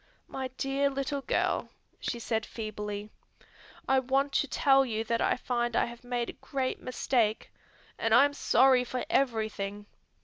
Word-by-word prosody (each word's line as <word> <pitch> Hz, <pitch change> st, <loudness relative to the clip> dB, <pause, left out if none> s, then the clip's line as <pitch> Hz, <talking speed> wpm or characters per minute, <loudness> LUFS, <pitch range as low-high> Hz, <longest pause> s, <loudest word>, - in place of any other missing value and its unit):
"My 265 Hz, -1 st, -4 dB
dear 275 Hz, +1 st, +1 dB
little 275 Hz, +1 st, -2 dB
girl," -, -, 0 dB, 0.3 s
she 240 Hz, -, -3 dB
said 225 Hz, -1 st, -1 dB
feebly, 210 Hz, -2 st, -6 dB, 0.8 s
"I 265 Hz, 0 st, +4 dB
want 270 Hz, +2 st, 0 dB
to 285 Hz, -, +2 dB
tell 270 Hz, -1 st, +4 dB
you 225 Hz, -4 st, -2 dB
that 230 Hz, 0 st, -1 dB
I -, -, +2 dB
find 240 Hz, -2 st, -1 dB
I -, -, +3 dB
have 235 Hz, +1 st, -10 dB
made 245 Hz, -1 st, -2 dB
a -, -, -26 dB
great 265 Hz, -2 st, -2 dB
mistake, 240 Hz, -3 st, 0 dB, 0.5 s
and 225 Hz, -, 0 dB
I 245 Hz, +5 st, +8 dB
am 285 Hz, -, -1 dB
sorry 260 Hz, -2 st, +4 dB
for 250 Hz, 0 st, -4 dB
everything. 215 Hz, -5 st, -1 dB
245 Hz, 160 wpm, -29 LUFS, 225-270 Hz, 0.8 s, I